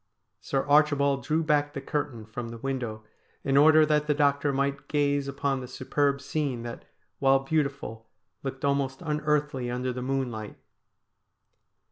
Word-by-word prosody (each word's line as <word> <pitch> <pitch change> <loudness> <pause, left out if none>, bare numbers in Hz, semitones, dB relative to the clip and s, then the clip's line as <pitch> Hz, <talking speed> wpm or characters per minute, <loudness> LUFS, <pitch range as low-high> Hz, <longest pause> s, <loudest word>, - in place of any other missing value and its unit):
Sir 135 -1 -1
Archibald 145 -2 +3
drew 155 +5 +1
back 145 -1 +1
the - - -2
curtain 135 -5 -3
from 115 +2 -6
the 115 - -7
window 120 -4 -4 0.4
in 135 - +1
order 155 +2 +7
that 150 0 +1
the 150 - +2
doctor 145 0 +2
might 140 +1 -1
gaze 145 -1 +1
upon 140 0 -1
the 125 - -7
superb 140 +2 0
scene 140 -4 -2
that, 120 -1 -7 0.3
while 135 0 +5
beautiful, 135 -6 -2 0.3
looked 135 0 -4
almost 140 +1 0
unearthly 150 -4 0
under 125 +1 -2
the 125 - -5
moonlight. 125 -5 -3
140 Hz, 145 wpm, -27 LUFS, 130-145 Hz, 0.4 s, order